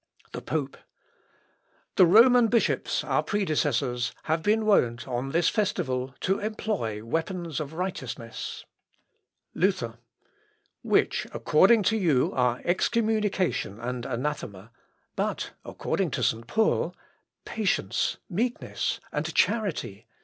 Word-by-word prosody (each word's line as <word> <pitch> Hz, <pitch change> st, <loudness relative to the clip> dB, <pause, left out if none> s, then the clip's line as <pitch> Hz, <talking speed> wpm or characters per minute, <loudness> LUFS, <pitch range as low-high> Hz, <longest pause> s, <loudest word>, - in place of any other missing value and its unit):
The -, -, -6 dB
Pope. 145 Hz, -3 st, -3 dB, 1.2 s
"The 185 Hz, -, +7 dB
Roman 235 Hz, +5 st, +7 dB
bishops, 230 Hz, 0 st, +1 dB
our -, -, +1 dB
predecessors, 145 Hz, -, 0 dB
have 160 Hz, +1 st, 0 dB
been 215 Hz, +5 st, +2 dB
wont, 120 Hz, -, +2 dB
on 125 Hz, +1 st, -2 dB
this 165 Hz, +4 st, +2 dB
festival, 135 Hz, -, -1 dB
to 190 Hz, +1 st, +1 dB
employ 210 Hz, -, -2 dB
the 105 Hz, -, -7 dB
weapons 165 Hz, +5 st, -3 dB
of 155 Hz, 0 st, -5 dB
righteousness."... 135 Hz, -10 st, -5 dB, 0.9 s
Luther. 130 Hz, -, 0 dB, 0.8 s
"Which, -, -, +1 dB
according 200 Hz, +8 st, +4 dB
to 220 Hz, +4 st, +2 dB
you, 160 Hz, -11 st, +2 dB
are 125 Hz, -1 st, +1 dB
excommunication 210 Hz, -, 0 dB
and 125 Hz, +1 st, -4 dB
anathema, 120 Hz, -6 st, -4 dB, 0.4 s
but -, -, -2 dB
according -, -, -2 dB
to -, -, -2 dB
St. 115 Hz, +1 st, 0 dB
Paul, 220 Hz, -, +1 dB, 0.5 s
patience, 215 Hz, -4 st, 0 dB
meekness, 235 Hz, +6 st, -2 dB
and -, -, -2 dB
charity." 190 Hz, -, 0 dB
165 Hz, 110 wpm, -27 LUFS, 125-210 Hz, 1.2 s, The